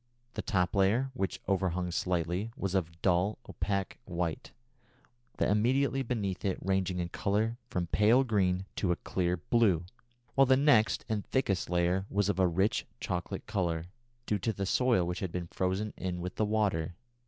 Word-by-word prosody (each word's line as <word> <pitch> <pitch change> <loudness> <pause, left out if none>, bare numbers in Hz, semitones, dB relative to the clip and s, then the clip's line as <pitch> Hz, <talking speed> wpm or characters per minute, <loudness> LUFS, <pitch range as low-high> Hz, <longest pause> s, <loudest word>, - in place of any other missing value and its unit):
The - - -3
top 90 -4 0
layer, 110 +8 +3
which 95 -7 -2
overhung 90 -2 0
slightly, 90 +3 -1
was 95 -1 -2
of 85 -3 -1
dull 95 +3 +2
opaque 100 +1 -2
white, 85 -3 -3 0.9
that - - +2
immediately 130 +6 +2
beneath 105 -7 -2
it 95 -2 0
ranging 95 -1 0
in 85 -1 -2
colour 110 +6 0
from 90 -1 -1
pale 110 +9 +4
green 95 -6 +1
to 90 - +1
a - - +2
clear 90 0 -1
blue, 95 -3 +2 0.5
while 135 -1 +5
the 130 0 +5
next 135 -6 +4
and 105 -2 -1
thickest 100 -11 0
layer 90 +2 +1
was 100 0 +1
of 95 -2 0
a 95 - +5
rich 95 +7 +1
chocolate 90 +1 -3
colour, 85 -6 -1 0.4
due 105 - 0
to 110 - 0
the 100 -2 -3
soil 115 -2 +3
which 90 0 -3
had 95 -3 -3
been 90 0 -3
frozen 95 +3 -1
in 90 -1 -3
with 90 +1 -4
the 110 - 0
water. 100 -6 0
95 Hz, 170 wpm, -31 LUFS, 90-110 Hz, 0.9 s, while